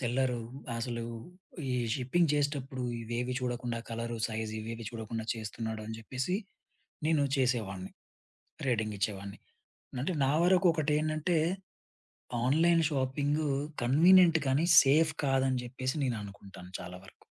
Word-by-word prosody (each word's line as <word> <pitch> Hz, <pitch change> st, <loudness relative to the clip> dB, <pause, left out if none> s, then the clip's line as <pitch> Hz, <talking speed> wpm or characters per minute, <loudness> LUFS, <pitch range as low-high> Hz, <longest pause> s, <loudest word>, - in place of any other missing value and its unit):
Seller 125 Hz, 0 st, 0 dB, 0.4 s
అసలు 115 Hz, -1 st, -3 dB, 0.7 s
ఈ -, -, 0 dB, 0.2 s
shipping 140 Hz, +5 st, +1 dB
చేసేటప్పుడు 140 Hz, -3 st, -1 dB, 0.2 s
ఇవేవి 120 Hz, +2 st, -2 dB
చూడకుండా 120 Hz, -1 st, -2 dB
కలరు, 115 Hz, 0 st, -3 dB
సైజ్ 110 Hz, -1 st, -4 dB
ఇవేవి 115 Hz, +1 st, -6 dB
చూడకుండా 110 Hz, -1 st, -5 dB
చేస్తున్నాడని 110 Hz, 0 st, -5 dB
జెప్పేసి 130 Hz, -, -2 dB, 0.7 s
నేను 155 Hz, -3 st, +3 dB
చేసేవాడ్ని. 105 Hz, -8 st, -1 dB, 0.8 s
రేటింగ్ 110 Hz, -4 st, 0 dB
ఇచ్చేవాడ్ని. 100 Hz, 0 st, -3 dB, 0.6 s
అంటే 180 Hz, -, 0 dB
నా 135 Hz, -, +2 dB
వరకొకటెంటంటే 160 Hz, -2 st, +2 dB, 1.1 s
ఆన్‌లైన్ 165 Hz, +5 st, +4 dB
షాపింగు 145 Hz, +2 st, 0 dB, 0.3 s
కన్వీనియంట్ 165 Hz, +6 st, +6 dB
కానీ 140 Hz, +5 st, +2 dB, 0.2 s
సేఫ్ 155 Hz, +3 st, +4 dB
కాదని 135 Hz, -1 st, +2 dB
జెప్పేసి 130 Hz, +1 st, -3 dB
నేననుకుంటాను 100 Hz, -6 st, -6 dB
చాలా 90 Hz, +1 st, -8 dB
వరకు. -, -, -18 dB
130 Hz, 105 wpm, -31 LUFS, 115-150 Hz, 1.1 s, కన్వీనియంట్